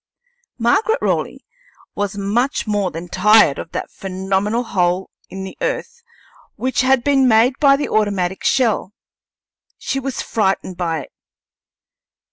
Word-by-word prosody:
Margaret 400 Hz, -, +2 dB
Raleigh -, -, -2 dB, 0.5 s
was 205 Hz, 0 st, -3 dB
much 220 Hz, +7 st, 0 dB
more 205 Hz, -3 st, 0 dB
than 170 Hz, +1 st, -7 dB
tired 210 Hz, -4 st, +4 dB
of 165 Hz, -, -7 dB
that -, -, -4 dB
phenomenal 195 Hz, +4 st, -2 dB
hole 180 Hz, -4 st, -1 dB, 0.2 s
in 190 Hz, 0 st, -7 dB
the 190 Hz, -, -8 dB
earth -, -, -3 dB, 0.5 s
which 255 Hz, -1 st, 0 dB
had 260 Hz, -1 st, +3 dB
been 275 Hz, -2 st, +3 dB
made 230 Hz, +2 st, +4 dB
by 280 Hz, -2 st, +6 dB
the 290 Hz, -, -2 dB
automatic 200 Hz, -4 st, 0 dB
shell; 235 Hz, -6 st, +1 dB, 0.8 s
she 270 Hz, -, -3 dB
was 270 Hz, -1 st, -4 dB
frightened 195 Hz, -3 st, -1 dB
by 165 Hz, -3 st, -2 dB
it. -, -, -13 dB
210 Hz, 130 wpm, -19 LUFS, 190-260 Hz, 0.8 s, by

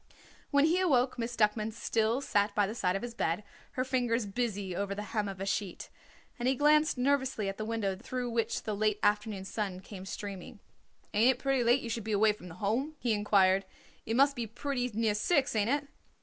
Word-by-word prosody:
When 285 Hz, 0 st, +4 dB
he 340 Hz, +3 st, +3 dB
awoke 260 Hz, -9 st, +2 dB
Miss 235 Hz, +1 st, -3 dB
Duckman 215 Hz, 0 st, +1 dB
still 225 Hz, +2 st, 0 dB
sat 205 Hz, -5 st, +1 dB
by 205 Hz, -, +3 dB
the 205 Hz, -, -4 dB
side 185 Hz, -5 st, 0 dB
of 195 Hz, -, -3 dB
his 240 Hz, -1 st, -5 dB
bed, 175 Hz, -3 st, -1 dB, 0.3 s
her 255 Hz, -, 0 dB
fingers 245 Hz, -3 st, 0 dB
busy 200 Hz, -3 st, -2 dB
over 200 Hz, +1 st, -2 dB
the 205 Hz, -, -4 dB
hem 210 Hz, -2 st, 0 dB
of 190 Hz, -1 st, -7 dB
a 195 Hz, -, -3 dB
sheet, 200 Hz, -2 st, -3 dB, 0.5 s
and 240 Hz, -, 0 dB
he 265 Hz, -, +3 dB
glanced 300 Hz, +2 st, +4 dB
nervously 265 Hz, -5 st, +1 dB
at 195 Hz, -, -3 dB
the 215 Hz, -, -2 dB
window 215 Hz, -4 st, -1 dB
through 245 Hz, +3 st, -4 dB
which 230 Hz, -1 st, -1 dB
the 215 Hz, -, -2 dB
late 210 Hz, 0 st, +1 dB
afternoon 210 Hz, -2 st, +1 dB
sun 195 Hz, -3 st, -3 dB
came 190 Hz, 0 st, -10 dB
streaming. 200 Hz, +2 st, -7 dB, 0.5 s
"Ain't 235 Hz, +5 st, +5 dB
it -, -, -20 dB
pretty 270 Hz, -2 st, +1 dB
late 240 Hz, +3 st, +4 dB
you 235 Hz, -, -4 dB
should 230 Hz, -1 st, -3 dB
be 220 Hz, 0 st, -2 dB
away 210 Hz, +1 st, +4 dB
from 180 Hz, -3 st, -12 dB
the 165 Hz, -, -10 dB
Home?" 235 Hz, -, -1 dB
he 240 Hz, -5 st, 0 dB
inquired. 195 Hz, -2 st, +3 dB, 0.4 s
"It 225 Hz, -, 0 dB
must 275 Hz, +2 st, +4 dB
be 235 Hz, -2 st, -3 dB
pretty 250 Hz, +2 st, -2 dB
near 220 Hz, 0 st, +1 dB
six, 270 Hz, +5 st, +1 dB
ain't 210 Hz, +1 st, +2 dB
it?" 285 Hz, +1 st, 0 dB
225 Hz, 215 wpm, -31 LUFS, 205-250 Hz, 0.5 s, Ain't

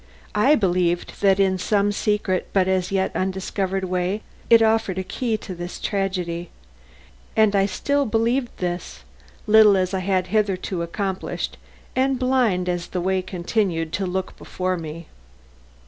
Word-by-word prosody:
I 255 Hz, +9 st, +4 dB
believed 175 Hz, -, 0 dB
that 195 Hz, -1 st, +4 dB
in 190 Hz, -1 st, +2 dB
some 205 Hz, +1 st, +2 dB
secret 205 Hz, -2 st, 0 dB
but 190 Hz, -2 st, +3 dB
as 185 Hz, -1 st, 0 dB
yet 190 Hz, -1 st, 0 dB
undiscovered 190 Hz, 0 st, -2 dB
way, 185 Hz, +3 st, -1 dB, 0.3 s
it 230 Hz, -1 st, +7 dB
offered 220 Hz, -4 st, +2 dB
a 190 Hz, -, -1 dB
key 225 Hz, +3 st, -2 dB
to 195 Hz, -, -8 dB
this 175 Hz, 0 st, -7 dB
tragedy. 180 Hz, -4 st, -2 dB, 0.9 s
And 215 Hz, -2 st, +4 dB
I 195 Hz, 0 st, +3 dB
still 280 Hz, +6 st, 0 dB
believed 235 Hz, +3 st, +1 dB
this, 175 Hz, -1 st, -4 dB, 0.4 s
little 215 Hz, -2 st, +7 dB
as 185 Hz, 0 st, 0 dB
I 190 Hz, -, 0 dB
had 185 Hz, 0 st, 0 dB
hitherto 195 Hz, -4 st, 0 dB
accomplished 190 Hz, +3 st, -3 dB, 0.4 s
and 265 Hz, 0 st, +2 dB
blind 245 Hz, -8 st, +1 dB
as 175 Hz, -1 st, -2 dB
the 180 Hz, -, -3 dB
way 190 Hz, +1 st, +1 dB
continued 175 Hz, -3 st, -1 dB
to 195 Hz, -1 st, -1 dB
look 190 Hz, +1 st, -3 dB
before 185 Hz, 0 st, -2 dB
me. 165 Hz, 0 st, -7 dB
190 Hz, 145 wpm, -23 LUFS, 180-215 Hz, 0.9 s, it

